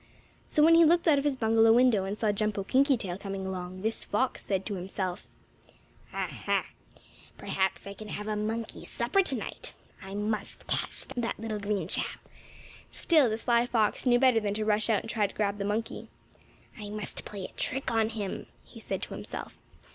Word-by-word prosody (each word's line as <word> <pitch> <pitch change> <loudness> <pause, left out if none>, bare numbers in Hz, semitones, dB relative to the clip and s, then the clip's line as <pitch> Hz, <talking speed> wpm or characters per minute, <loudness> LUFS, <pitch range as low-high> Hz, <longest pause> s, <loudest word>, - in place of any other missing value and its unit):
So 300 - +3
when 330 +2 +7
he 335 0 +8
looked 335 +2 +4
out 295 -3 +6
of - - -2
his 290 -2 +1
bungalow 225 -2 +4
window, 235 -5 +4
and 200 +2 -3
saw 215 -2 +2
Jumpo 205 -1 -1
Kinkytail 255 -8 +2
coming 195 -1 -5
along, 185 0 -5
this 220 +1 0
fox 255 +5 -1
said 190 -1 -1
to 210 - -3
himself: 185 -1 -4 0.8
"Ah, - - -2 0.2
ha! - - +1 0.7
Perhaps 190 -1 -1
I 200 - -6
can 215 +2 -10
have 210 0 -5
a 215 - -1
monkey 220 +2 -3
supper 240 +12 +1
tonight. 270 - -3 0.3
I 195 +1 -7
must 210 0 -2
catch - - 0
that 240 -1 -3
little 220 -1 -3
green 200 -4 -1
chap." - - 0 0.7
Still 305 -8 +3
the 220 - -1
sly 235 +1 +2
fox 225 +1 +1
knew 245 -1 +6
better 255 -2 +5
than 205 -2 -2
to 215 0 -1
rush 215 +1 +2
out 215 -3 +3
and 225 - -9
try 210 -3 +2
to - - -14
grab 205 -1 0
the 200 - -1
monkey. 215 +3 -2 0.7
"I 205 -1 -6
must 210 0 -4
play 200 -3 -6
a - - -9
trick 265 +1 -2
on 225 -1 +2
him," 210 -4 -4 0.2
he - - -13
said - - -4
to - - -6
himself. - - -7
215 Hz, 195 wpm, -29 LUFS, 200-240 Hz, 0.8 s, he